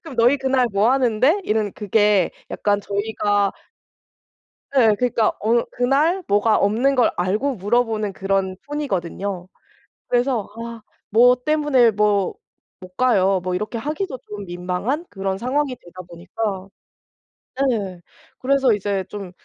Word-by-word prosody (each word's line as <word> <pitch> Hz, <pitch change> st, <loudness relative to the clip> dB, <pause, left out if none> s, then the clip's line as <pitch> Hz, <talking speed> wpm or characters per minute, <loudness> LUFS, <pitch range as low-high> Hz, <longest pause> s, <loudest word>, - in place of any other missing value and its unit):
그럼 320 Hz, -6 st, -10 dB
"너희 240 Hz, +4 st, +4 dB
그날 265 Hz, -2 st, +1 dB
뭐 205 Hz, +4 st, +3 dB
하는데?" 260 Hz, -, +2 dB
이런 215 Hz, -, 0 dB
그게 210 Hz, -2 st, +2 dB, 0.2 s
약간 205 Hz, -1 st, 0 dB
저희가 205 Hz, 0 st, 0 dB, 1.2 s
예. 225 Hz, -5 st, +5 dB
그러니까 235 Hz, -3 st, +2 dB
어 230 Hz, +3 st, +2 dB
그날 295 Hz, +9 st, +1 dB
뭐가 205 Hz, +2 st, +3 dB
없는 235 Hz, +7 st, +2 dB
걸 245 Hz, -4 st, +3 dB
알고 215 Hz, +10 st, 0 dB
물어보는 215 Hz, 0 st, 0 dB
그런 195 Hz, -1 st, -1 dB
톤이거든요. 195 Hz, -, -3 dB, 0.6 s
그래서 245 Hz, -3 st, +1 dB, 0.2 s
아 230 Hz, -1 st, -8 dB, 0.3 s
"뭐 245 Hz, +4 st, +6 dB
때문에 295 Hz, -6 st, +3 dB
뭐 205 Hz, -2 st, +1 dB, 0.5 s
못 185 Hz, 0 st, -13 dB
가요." 195 Hz, -7 st, +3 dB
뭐 185 Hz, 0 st, -2 dB
이렇게 210 Hz, +5 st, -3 dB
하기도 300 Hz, -, -4 dB
좀 205 Hz, -1 st, -7 dB
민망한 180 Hz, -, -3 dB
그런 195 Hz, -1 st, -3 dB
상황이 260 Hz, +3 st, -1 dB
되다 185 Hz, -3 st, -12 dB
보니까 190 Hz, +3 st, -5 dB, 1.1 s
예, 195 Hz, -6 st, -4 dB, 0.4 s
그래서 270 Hz, -1 st, +3 dB
이제 200 Hz, -2 st, -2 dB
좀 200 Hz, -3 st, -7 dB
215 Hz, 260 characters per minute, -21 LUFS, 195-255 Hz, 1.2 s, 뭐